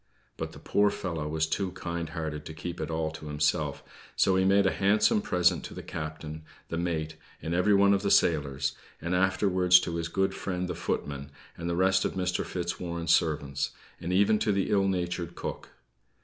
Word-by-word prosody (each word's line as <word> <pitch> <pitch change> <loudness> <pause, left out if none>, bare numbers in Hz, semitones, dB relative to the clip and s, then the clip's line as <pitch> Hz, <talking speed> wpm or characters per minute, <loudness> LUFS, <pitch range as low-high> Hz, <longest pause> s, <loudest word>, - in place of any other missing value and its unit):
But - - -5
the - - -11
poor 105 0 +2
fellow 85 -6 -3
was 80 +1 0
too 90 +3 -2
kind 85 -3 -4
hearted 80 -3 -4
to 80 - -8
keep 85 +1 -5
it 80 - -3
all 80 -1 -1
to 80 -1 -9
himself; 75 0 0 0.3
so 95 - +3
he 95 - +3
made 100 +1 +4
a 95 - +4
handsome 105 +1 +3
present 90 -4 +2
to - - -8
the - - -7
captain, 75 0 -6 0.3
the 85 - -2
mate, 80 -2 -2 0.2
and 80 - -4
every 95 +4 +4
one 100 0 +5
of 100 - +2
the 100 - 0
sailors, 70 -7 +2 0.3
and 85 +3 -3
afterwards 90 -1 +4
to 85 -1 -3
his 85 0 -2
good 95 +3 0
friend 90 -2 -3
the - - -3
footman, 70 -1 -3 0.3
and 85 0 -4
the 85 - 0
rest 95 +1 +3
of - - -1
Mr. 90 -1 -1
Fitzwarren's 85 -1 -2
servants; 70 -4 0 0.3
and 85 - -4
even 100 +3 +4
to 105 - +1
the 100 -1 0
ill 100 -1 +3
natured 90 -2 -2
cook. - - -6
85 Hz, 195 wpm, -28 LUFS, 80-95 Hz, 0.3 s, one